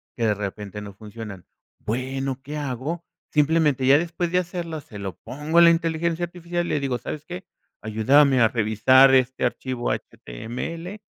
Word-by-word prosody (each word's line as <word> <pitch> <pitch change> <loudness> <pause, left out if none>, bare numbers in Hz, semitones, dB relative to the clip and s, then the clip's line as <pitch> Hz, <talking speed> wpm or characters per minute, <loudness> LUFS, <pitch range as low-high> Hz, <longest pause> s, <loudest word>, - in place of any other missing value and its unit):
que 115 - -1
de 105 - +3
repente 105 0 -6
no 100 -1 -9
funcionan. 105 -2 -9 0.3
Bueno, 130 +3 -3
¿qué 150 +2 -6
hago? 145 +4 -4 0.3
Simplemente 150 -3 +3
ya 140 +2 +7
después 170 +1 -2
de 180 - +2
hacerlo 170 -3 -4
se 105 -6 -11
lo 95 -4 -6
pongo 150 +7 -3
a - - +9
la 170 - +9
inteligencia 165 0 0
artificial 175 0 -4
y - - -4
le 150 - +1
digo, 135 -3 -1
¿sabes 150 0 -6
qué? 180 +3 -8 0.4
Ayúdame 130 +6 +4
a 115 - +6
revisar 120 +4 +5
este 130 0 +1
archivo 125 0 -2
H-T-M-L 165 - -6
135 Hz, 165 wpm, -24 LUFS, 115-165 Hz, 0.4 s, a